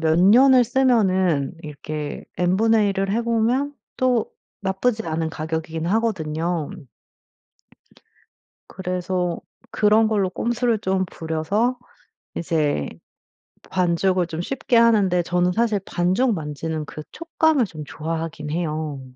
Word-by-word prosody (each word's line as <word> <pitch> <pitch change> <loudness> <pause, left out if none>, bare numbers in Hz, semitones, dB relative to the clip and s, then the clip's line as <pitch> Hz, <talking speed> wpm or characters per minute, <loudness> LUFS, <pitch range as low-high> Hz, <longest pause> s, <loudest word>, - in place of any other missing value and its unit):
몇 160 0 +2
년을 245 +7 +6
쓰면은 190 - +2
이렇게 150 0 -6
N분의 210 +4 +3
1을 195 0 -1
해 225 +4 +1
보면 235 +5 0 0.2
또 250 -3 +1 0.3
나쁘지 215 +4 0
않은 160 0 -1
가격이긴 160 +1 -4
하거든요. 175 -6 -1 2.0
그래서 180 -1 -2 0.3
그런 215 +1 +3
걸로 200 -4 +1
꼼수를 235 +2 0
좀 190 -1 0
부려서 195 +10 -1 0.6
이제 150 - 0 0.8
반죽을 180 0 +1
좀 165 0 -5
쉽게 255 +4 -1
하는데 210 -6 +4
저는 180 +1 +1
사실 220 -1 +1
반죽 190 +7 +1
만지는 155 0 -4
그 155 - -8
촉감을 320 -4 +1
좀 155 -5 -8
좋아하긴 160 -1 -5
해요. 155 -3 -3
185 Hz, 235 characters per minute, -22 LUFS, 160-225 Hz, 2.0 s, 년을